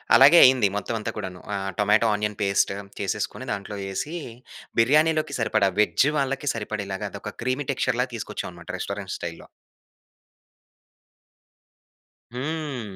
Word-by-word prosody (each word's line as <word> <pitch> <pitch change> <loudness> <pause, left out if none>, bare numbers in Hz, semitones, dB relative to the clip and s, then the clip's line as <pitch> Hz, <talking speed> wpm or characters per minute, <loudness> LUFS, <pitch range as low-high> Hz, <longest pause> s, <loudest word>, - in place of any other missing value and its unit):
అలాగే 140 +8 +8
అయింది 130 -5 +5
మొత్తం 105 +3 -3
అంతా 105 - -3
కూడాను. 90 -1 -6
ఆహ్, 95 0 -3
టొమాటో 105 +2 +4
ఆనియన్ 105 0 -2
పేస్ట్ 100 -1 +2 0.3
చేసేసుకొని, 100 -2 -3
దాంట్లో 100 +1 -4
యేసీ, 95 - -4 0.6
బిర్యానీలోకి 155 +6 +3
సరిపడా, 110 -3 +2
వెజ్జ్ 105 +5 +3
వాళ్ళకి 135 0 -1
సరిపడేలాగా, 105 -3 -4
అదొక - - -7
క్రీమీ 130 +3 -1
టెక్చర్‌లాగా 125 -1 0
తీసుకొచ్చావనమాట 115 - -6
రెస్టారెంట్ - - -4
స్టైల్‌లో. - - -7 2.9
హ్మ్. 135 -7 -4
115 Hz, 110 wpm, -25 LUFS, 100-135 Hz, 2.9 s, అలాగే